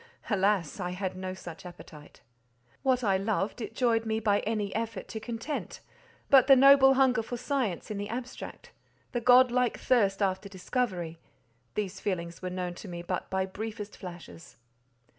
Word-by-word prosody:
Alas! 195 -4 +1
I 180 -1 -2
had 185 +1 -3
no 185 0 -5
such 170 -3 -9
appetite. 170 -4 -12 0.6
What 255 -2 +2
I 195 -3 +3
loved, 205 +3 -1
it 225 - -6
joyed 230 -3 +2
me 220 0 -1
by 205 -2 +2
any 210 -2 -2
effort 225 +1 -3
to 220 - -5
content; 235 +6 -5 0.5
but 265 -2 +6
the 270 - +9
noble 270 0 +7
hunger 260 -3 +4
for 240 +2 -5
science 245 - -2
in 205 - -3
the 205 +1 -4
abstract—the 245 0 -8
godlike 250 0 +5
thirst 205 -5 +2
after 195 +1 -1
discovery—these 180 - -5
feelings 170 -4 -3
were 185 - -3
known 180 -1 -3
to 190 - -10
me 175 -1 -6
but 180 +1 -3
by 190 0 0
briefest 210 +1 -6
flashes. 175 -3 -11
205 Hz, 155 wpm, -29 LUFS, 185-240 Hz, 0.6 s, the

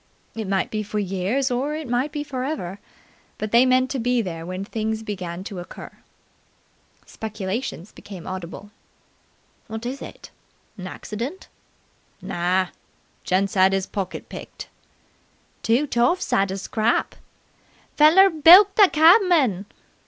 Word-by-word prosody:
It 220 -3 -5
might 195 -1 -1
be 215 - -2
for 210 0 -5
years 205 +7 -1
or 275 +5 -1
it 310 -2 -6
might 245 +5 -1
be 295 -1 -4
for 265 -3 -5
ever, 205 - -4 0.6
but 215 -1 -4
they 240 +2 +5
meant 255 0 +2
to 270 - -2
be 245 +1 +1
there 165 -3 -6
when 185 +2 -5
things 220 0 -3
began 185 -4 -6
to 195 -2 -7
occur. 175 - -10 1.1
Speculations 210 -2 -5
became 190 -5 -11
audible. 185 +2 -7 1.0
"Wot 220 +1 -6
is 260 +3 -5
it? - - -11 0.4
'Naccident?" 225 - -7 0.7
"Nah! 180 +1 -1 0.5
Gent 195 +2 0
'ad 190 0 +4
'is 190 -1 -1
pocket 195 -1 -5
picked!" - - -10 0.9
"Two 240 +6 +2
toffs 245 +7 0
'ad 195 0 +2
a 190 - -4
scrap!" 220 +3 -1 0.8
"Feller 350 +6 +6
bilked 360 +6 +7
the 405 -3 +7
cabman!" 315 - +4
220 Hz, 130 wpm, -23 LUFS, 190-275 Hz, 1.1 s, bilked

